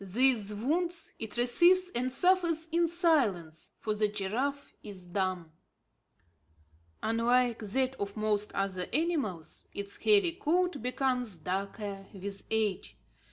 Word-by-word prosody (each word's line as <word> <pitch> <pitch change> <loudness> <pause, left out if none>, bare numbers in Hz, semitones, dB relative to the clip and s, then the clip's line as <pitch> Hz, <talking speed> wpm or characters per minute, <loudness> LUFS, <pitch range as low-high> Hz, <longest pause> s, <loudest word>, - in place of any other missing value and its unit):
These 215 0 +2
wounds 330 - -1
it 225 +1 -5
receives 345 +10 +4
and 250 +2 0
suffers 340 0 +2
in 340 +1 +3
silence; 245 - +1
for 215 - -2
the 210 0 +2
giraffe 230 +8 -2
is 195 -4 -8
dumb. 180 -2 -2 1.5
Unlike 235 +1 +2
that 255 +5 0
of 200 +1 -4
most 210 -1 0
other 190 -2 -1
animals, 275 - -1
its 200 0 -5
hairy 400 -5 +4
coat 355 - 0
becomes 250 -4 -1
darker 195 +3 -4
with 195 +1 -6
age. 215 -4 -1
230 Hz, 115 wpm, -30 LUFS, 200-310 Hz, 1.5 s, receives